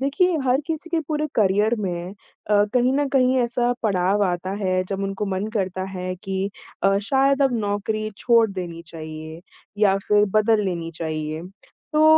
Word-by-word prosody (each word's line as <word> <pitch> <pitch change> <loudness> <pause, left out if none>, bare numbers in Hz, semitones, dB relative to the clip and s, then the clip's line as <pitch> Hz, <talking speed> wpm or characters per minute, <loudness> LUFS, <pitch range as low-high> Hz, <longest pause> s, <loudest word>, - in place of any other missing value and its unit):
देखिए 330 +6 +2
हर 255 +1 +3
किसी 325 +1 -4
के 335 -1 +1
पूरे 305 -1 0
करियर 210 +2 +3
में 180 -2 -4 0.4
अ, 205 0 +5
कहीं 250 +1 +3
न 285 +1 +1
कहीं 260 -1 +3
ऐसा 240 0 +1
पड़ाव 200 -1 +2
आता 180 0 -2
है 185 -1 +1
जब 195 +1 -4
उनको 195 +1 -2
मन 190 +1 -2
करता 190 -2 -1
है 185 -1 -4
कि 195 0 -2 0.3
अ, 195 0 +4
शायद 275 +1 +3
अब 270 -2 +3
नौकरी 215 +1 -2
छोड़ 230 -2 +4
देनी 175 -3 -6
चाहिए 160 0 -8 0.4
या 195 -2 +5
फ़िर 210 0 +5
बदल 215 0 +3
लेनी 170 -3 -3
चाहिए। 155 -1 -3 0.5
तो 305 0 +4
205 Hz, 170 wpm, -23 LUFS, 185-250 Hz, 0.5 s, अ